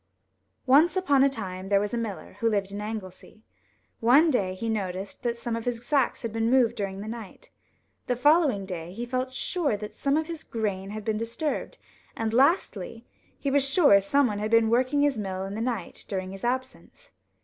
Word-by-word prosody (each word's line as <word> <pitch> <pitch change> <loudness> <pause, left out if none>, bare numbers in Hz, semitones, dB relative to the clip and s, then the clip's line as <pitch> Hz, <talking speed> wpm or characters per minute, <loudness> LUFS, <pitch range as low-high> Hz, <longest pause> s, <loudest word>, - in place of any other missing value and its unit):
ONCE 300 +8 +5
upon 285 -8 +3
a 275 - +5
time 190 -7 -6
there 200 -1 +4
was 205 +2 -2
a - - 0
miller, 220 -5 -6
who 230 - +2
lived 200 -2 -1
in 205 +1 -5
Anglesey. 215 0 -8 0.6
One 280 +8 +5
day 190 -7 0
he 230 +5 -4
noticed 195 -3 -3
that 240 -1 -2
some 235 0 -3
of 230 - -5
his 240 -1 -3
sacks 275 -4 +1
had 230 -2 -4
been 225 0 0
moved 245 -2 +4
during 195 -3 -4
the 210 - -7
night. 225 -3 -9 0.6
The 245 - +1
following 285 - +3
day 175 -2 -6
he 235 +4 -4
felt 255 +1 -2
sure 285 - -1
that 210 0 -7
some 280 +1 0
of 315 - 0
his 330 -1 -7
grain 200 -4 -3
had 215 0 -6
been 220 -1 0
disturbed, 230 +7 -3 0.4
and, 225 -1 -1
lastly, 240 - +1 0.3
he 280 - -2
was 280 0 +4
sure 275 - +5
someone 215 0 +1
had 215 +1 -2
been 230 0 +4
working 255 +4 +2
his 280 -6 +1
mill 190 -2 -3
in 195 +1 -5
the 220 - -4
night 230 -7 -3
during 185 -2 -4
his 195 0 -9
absence. 260 - -4
230 Hz, 200 wpm, -27 LUFS, 200-265 Hz, 0.6 s, ONCE